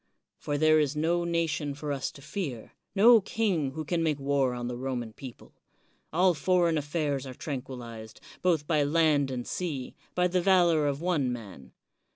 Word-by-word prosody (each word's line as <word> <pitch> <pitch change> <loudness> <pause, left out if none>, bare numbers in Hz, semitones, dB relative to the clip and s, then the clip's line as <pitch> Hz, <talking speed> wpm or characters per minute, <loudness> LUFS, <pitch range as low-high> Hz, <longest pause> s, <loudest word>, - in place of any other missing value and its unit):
For 145 - -2
there 155 +1 +5
is 150 -1 0
no 170 +3 +1
nation 165 -4 -1
for 145 0 -5
us 135 -2 -2
to 140 - -14
fear, 140 - -5
— - - -16
^no 225 +1 +7
king 185 -12 0
who 155 +1 -5
can 170 +2 0
make 155 -3 +1
war 135 -2 +1
on 120 0 -4
the 125 - -4
Roman 120 -3 -4
people. 130 -1 -11 0.6
All 180 +3 +4
foreign 175 0 +2
affairs 145 -2 -2
are 130 - -8
tranquilized, 125 -6 -7 0.2
both 165 -5 +2
by 155 -1 +2
land 145 -2 +3
and 125 -2 -4
sea, 150 -8 -4 0.2
by 180 0 +3
the 180 0 +1
valor 175 -5 +4
of 140 +1 -2
one 155 -8 +1
man. 105 - -9
150 Hz, 180 wpm, -28 LUFS, 130-170 Hz, 0.6 s, ^no